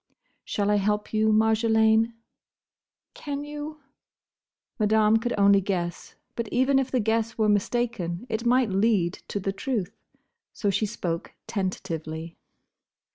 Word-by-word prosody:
"Shall 205 0 -1
I 210 - +4
help 210 +1 -1
you, 215 0 +3
Marjolaine?" 220 +1 +3 1.0
"Can 285 -1 -5
you?" 295 +1 -7 1.0
Madame 215 +1 +4
could 240 +2 -2
only 200 0 +5
guess; 175 -3 -3 0.2
but 235 -1 -3
even 260 +4 +2
if 265 -1 -1
the 255 - +1
guess 225 +1 0
were 215 -1 +2
mistaken, 210 -3 0
it 225 -1 -2
might 245 -2 +3
lead 195 -3 +2
to 205 - -3
the 195 0 -2
truth. 210 -2 -3 0.6
So 205 - 0
she 215 +2 0
spoke 170 -4 -4
tentatively. 165 -4 -4
215 Hz, 130 wpm, -26 LUFS, 195-235 Hz, 1.0 s, only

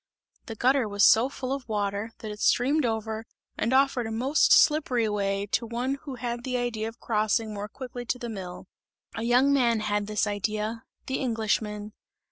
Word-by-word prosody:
The 225 - -6
gutter 255 +1 +2
was 205 -1 +1
so 235 +4 +6
full 265 -1 -4
of 275 -4 -6
water, 205 0 -1
that 215 - -7
it 210 - -8
streamed 275 +6 +3
over 220 0 -3 0.3
and 230 - -1
offered 265 -3 +3
a - - -5
most 260 +7 +2
slippery 260 -7 +4
way, 200 -1 -1
to 230 0 0
one 250 +4 -2
who 275 -3 -5
had 240 0 -4
the 255 -1 -1
idea 235 -3 -2
of 225 +1 -9
crossing 215 0 0
more 205 0 -5
quickly 245 0 -7
to 250 - 0
the 240 - -6
mill; 185 -5 -7 0.5
a 225 - -5
young 250 +4 +4
man 240 -5 +3
had 205 -1 -1
this 215 0 0
idea 215 +2 -2 0.2
the 265 - -2
Englishman. 215 -3 -1
225 Hz, 185 wpm, -27 LUFS, 210-250 Hz, 0.5 s, so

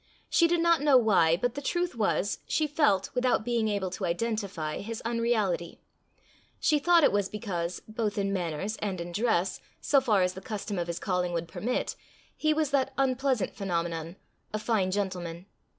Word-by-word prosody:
She 335 - +5
did 340 0 +1
not 335 -3 +4
know 290 -3 +6
why, 185 -8 +4
but 245 +5 -1
the 285 - -5
truth 350 +4 -1
was, 200 -2 0
she 310 - +1
felt, 290 - +1
without 250 -3 +1
being 235 -2 +1
able 200 -3 -1
to 190 - -3
identify, 185 -4 -2
his 225 +2 -5
unreality: 230 -7 0 0.8
she 300 -2 +3
thought 340 +2 +5
it - - +6
was 200 -1 0
because, 180 -5 -4
both 215 -1 -2
in 195 -1 0
manners 185 +3 -2
and 195 -4 -3
in 170 +1 -5
dress, 195 -2 0 0.2
so 280 -2 +3
far 215 -7 +3
as 180 0 0
the 190 - -9
custom 205 -1 -4
of 175 - -2
his 170 0 -3
calling 180 -2 -1
would 170 0 -2
permit, 245 +8 -2 0.4
he 310 - +1
was 305 -2 +1
that 270 -1 +1
unpleasant 260 -4 +1
phenomenon, 170 -3 -3 0.4
a 215 - -1
fine 215 -3 0
gentleman. 185 -3 -3
210 Hz, 180 wpm, -28 LUFS, 180-250 Hz, 0.8 s, know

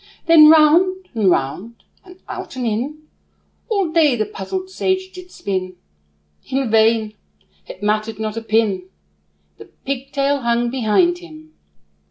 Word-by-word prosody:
Then 320 -2 +8
round, 355 +4 +4
and 215 -5 +2
round, 180 +11 -2 0.2
and 365 -1 -15
out - - -7
and 255 -1 -3
in, 260 +8 -3 0.7
All 395 -7 0
day 315 -5 +3
the 215 -2 -1
puzzled 370 - -6
sage 375 0 -2
did 365 -1 -12
spin; 185 - -4 0.7
In 265 -3 -1
vain 220 -1 +3 0.5
it 185 - -11
mattered 215 +1 -1
not 215 0 -4
a 230 - -4
pin, 215 -4 0 0.7
The - - -11
pigtail 275 +1 -3
hung 235 0 0
behind 265 - +1
him. 315 -3 -14
255 Hz, 135 wpm, -19 LUFS, 215-330 Hz, 0.7 s, Then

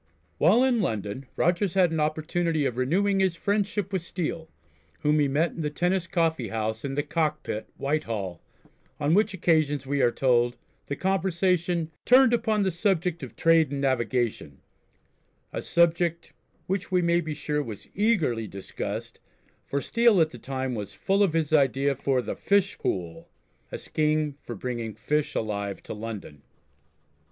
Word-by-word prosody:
While 205 - +5
in 250 -4 +2
London 110 - -3
Rogers 175 +2 +1
had 180 -3 +4
an 160 - -1
opportunity 155 +1 0
of 125 - -1
renewing 190 +10 +1
his 190 -3 +2
friendship 200 +1 -1
with 190 - 0
Steele, 165 -2 -4 0.5
whom 150 0 +3
he 145 - +3
met 150 +5 +1
in 165 - -6
the 150 - -1
Tennis 175 +3 0
Coffee 165 -8 0
House 110 0 -3
in 135 -1 -3
the 145 - 0
Cockpit, 150 -7 -2
Whitehall, 115 - -2 0.6
on 150 +2 +2
which 205 +1 +3
occasions 155 -6 +1
we 140 +1 0
are 120 - +5
told 120 -1 +2 0.3
the 140 - -2
conversation 180 -2 0
"turned 255 -1 +6
upon 220 -3 +1
the 190 - +1
subject 175 -2 0
of 130 - -8
trade 165 -3 +4
and 140 0 -3
navigation," 120 - -1 0.9
a - - -3
subject 170 0 +1 0.3
which 190 +1 -3
we 180 -1 +3
may 170 0 +3
be 155 -2 -4
sure 150 0 -1
was 110 -8 -8
eagerly 165 - +1
discussed, 95 -1 -6 0.5
for 140 - -1
Steele 230 +4 +3
at 160 -1 +3
the 120 - -10
time 130 +1 -3
was 105 -4 -5
full 195 +1 +1
of 195 -6 +3
his 160 -2 0
idea 140 -1 +3
for 130 -1 0
the - - -4
"Fish 200 -1 +1
Pool," 85 -3 -3 0.4
a - - -4
scheme 155 -1 0
for 120 - -7
bringing 115 -1 -4
fish 150 0 -1
alive 100 -2 -3
to - - -6
London. 105 -9 -7
155 Hz, 160 wpm, -26 LUFS, 130-180 Hz, 0.9 s, turned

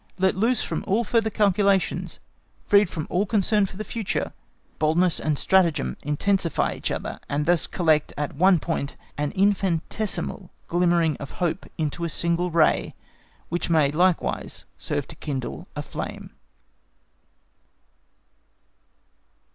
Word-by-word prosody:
Let 190 0 +3
loose 230 +5 +2
from - - -3
all 215 +5 +2
further 225 -1 +1
calculations, 200 -2 +1 0.5
freed 205 -3 +5
from 155 -3 -4
all 195 +4 +1
concern 210 0 +2
for 185 - -11
the 215 - -3
future, 215 0 -3 0.5
boldness 165 +3 +3
and 155 -2 0
stratagem 170 -6 +2
intensify 165 +4 0
each - - -4
other, - - -4
and 145 +1 0
thus 175 -1 +2
collect 160 -4 +2
at 145 0 -2
one 185 +5 +5
point 160 -4 -3 0.2
an 145 0 -1
infinitesimal 195 -1 0 0.2
glimmering 170 -3 +2
of 140 - -8
hope 175 +1 -2
into 160 +1 -2
a 170 - -1
single 170 +2 0
ray, 165 -2 +2 0.5
which 175 +1 -2
may 155 -4 +4
likewise 175 +3 0
serve - - -3
to - - -7
kindle 140 +5 -5
a 150 - -3
flame. - - -6
175 Hz, 130 wpm, -24 LUFS, 155-195 Hz, 0.5 s, freed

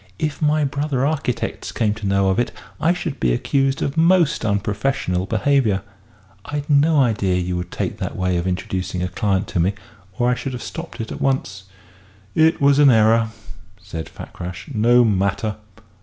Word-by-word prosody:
If 150 -1 -3
my 150 0 +2
brother 140 -1 -1
architects 140 -5 -2
came 105 -3 0
to 105 -2 -5
know 100 0 +2
of 95 - +1
it 120 - 0 0.3
I 165 - +3
should 175 -4 -3
be - - +2
accused 135 - 0
of 140 - -3
most 170 -1 +3
unprofessional 100 -2 -1
behaviour. 115 -3 +1 0.6
I'd 145 0 -4
no 150 +2 +4
idea 105 -7 +2
you 90 0 -1
would 90 0 -4
take - - -4
that - - -4
way 90 -1 0
of 85 +1 -2
introducing 90 0 -2
a - - 0
client 95 +1 -1
to - - -1
me, 95 +4 +1 0.4
or 120 - +2
I 125 - +3
should 125 +1 -4
have 125 - -6
stopped 165 -7 -7
it 110 - -6
at - - -6
once!" 100 -8 -1 0.7
"It 160 +1 +3
was 140 0 +4
an 145 -2 +7
error," 115 -1 +4 0.5
said 80 0 -7
Fakrash. 90 - -8
"No 120 +2 +4
matter. 100 +1 0
115 Hz, 175 wpm, -21 LUFS, 95-140 Hz, 0.7 s, an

